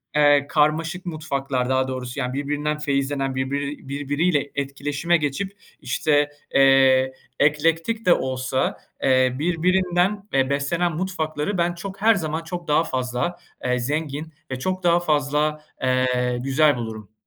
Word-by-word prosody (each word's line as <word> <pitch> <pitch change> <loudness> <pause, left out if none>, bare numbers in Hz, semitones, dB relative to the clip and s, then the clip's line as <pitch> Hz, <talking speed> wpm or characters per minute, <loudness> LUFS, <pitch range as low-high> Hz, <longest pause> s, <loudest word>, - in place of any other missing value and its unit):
eee, 145 -1 +5
karmaşık 165 +4 +1
mutfaklar 140 -6 -2
daha 130 0 +2
doğrusu 130 0 -5
yani 125 -1 -2
birbirinden 150 +2 -2
feyizlenen 140 -2 -1
birbiri 140 +1 -3
birbiriyle 145 +2 0
etkileşime 145 +4 0
geçip 155 +7 -2 0.3
işte, 145 +4 +1 0.3
eee, 135 -1 +5 0.3
eklektik 165 +9 +1
de 180 - +7
olsa, 130 -1 -1 0.3
eee, 130 -1 +3
birbirinden, 180 +4 +1
eee, 135 0 +2
beslenen 160 +5 0
mutfakları 170 0 -2
ben 175 0 +1
çok 195 +3 -8
her 225 +1 +5
zaman 160 -3 -3
çok 170 0 -6
daha 150 +2 +3
fazla, 130 +5 -2 0.3
eee, 125 0 +1
zengin 150 +3 -3 0.2
ve 130 - -3
çok 185 +7 -2
daha 175 0 +4
fazla, 150 -1 0 0.2
eee, 125 -1 +1
güzel 145 +2 +3
bulurum. 110 -3 -7
145 Hz, 130 wpm, -23 LUFS, 130-165 Hz, 0.3 s, de